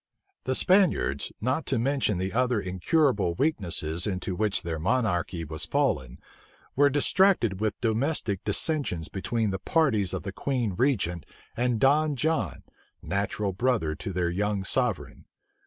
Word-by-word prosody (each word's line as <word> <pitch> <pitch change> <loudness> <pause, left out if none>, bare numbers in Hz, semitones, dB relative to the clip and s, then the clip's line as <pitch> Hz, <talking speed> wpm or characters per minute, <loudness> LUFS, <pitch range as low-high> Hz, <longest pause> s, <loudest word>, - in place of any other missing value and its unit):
The 130 - 0
Spaniards, 150 - +2
not 130 +7 -1
to 135 - +1
mention 125 -4 0
the 95 +1 -3
other 125 -1 +1
incurable 95 - +1
weaknesses 85 - 0
into 95 -1 -3
which 105 0 0
their 80 -2 -3
monarchy 90 -4 0
was 80 0 -3
fallen, 65 -1 0 0.6
were 145 +1 +5
distracted 145 - +2
with 110 -1 -2
domestic 115 - 0
dissensions 105 - 0
between 110 +2 -1
the 95 - -3
parties 110 - +1
of - - -4
the 95 0 -5
queen 125 -6 -1
regent 100 - 0 0.3
and 120 -1 0
Don 150 +3 +3
John, 160 +5 -1 0.4
natural 100 0 -2
brother 110 -7 0
to 80 +5 -6
their 90 -1 -1
young 100 +1 -1
sovereign. 120 +1 -2
105 Hz, 140 wpm, -27 LUFS, 90-130 Hz, 0.6 s, were